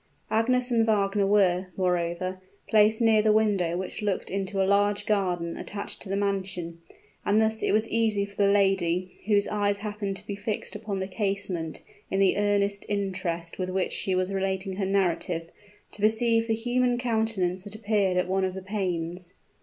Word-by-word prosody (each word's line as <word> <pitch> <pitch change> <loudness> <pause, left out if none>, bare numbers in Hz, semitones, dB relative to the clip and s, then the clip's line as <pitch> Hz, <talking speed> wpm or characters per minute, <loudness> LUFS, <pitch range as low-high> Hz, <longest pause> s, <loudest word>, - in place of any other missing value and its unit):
Agnes 250 +3 +2
and 230 -1 +4
Wagner 200 -2 +2
were, 190 -2 +3
moreover, 180 0 -1 0.3
placed 220 +1 +4
near 225 -2 +5
the 215 0 +3
window 200 -6 +2
which 190 +4 -5
looked 205 -3 -2
into 195 0 -2
a 190 - +3
large 205 +1 +2
garden 180 -5 0
attached 200 0 -5
to - - -6
the 195 - 0
mansion; 190 -4 -2 0.4
and 205 +2 +3
thus 220 0 +1
it - - +1
was 215 +2 +2
easy 220 -3 +1
for 200 0 -15
the 200 0 +5
lady, 185 -3 +1
whose 205 -2 +3
eyes 205 -1 0
happened 205 -1 -3
to - - -8
be 200 - -4
fixed 205 +1 -4
upon 210 -1 -4
the 190 0 -3
casement 195 -5 -3 0.3
in 195 - 0
the 195 -1 +4
earnest 200 0 +1
interest 185 -5 -3
with 185 0 -2
which 185 0 -1
she 190 - -1
was 185 +1 0
relating 190 0 -2
her 195 -2 -1
narrative, 175 -3 0 0.4
to 205 - -11
perceive 225 +1 +3
the 225 - +1
human 245 +2 +1
countenance 220 -7 0
that 205 +1 -10
appeared 205 -4 +1
at 180 - +1
one 190 +1 0
of 185 0 -1
the 190 - -6
panes. 180 -3 -3
200 Hz, 180 wpm, -27 LUFS, 185-210 Hz, 0.4 s, near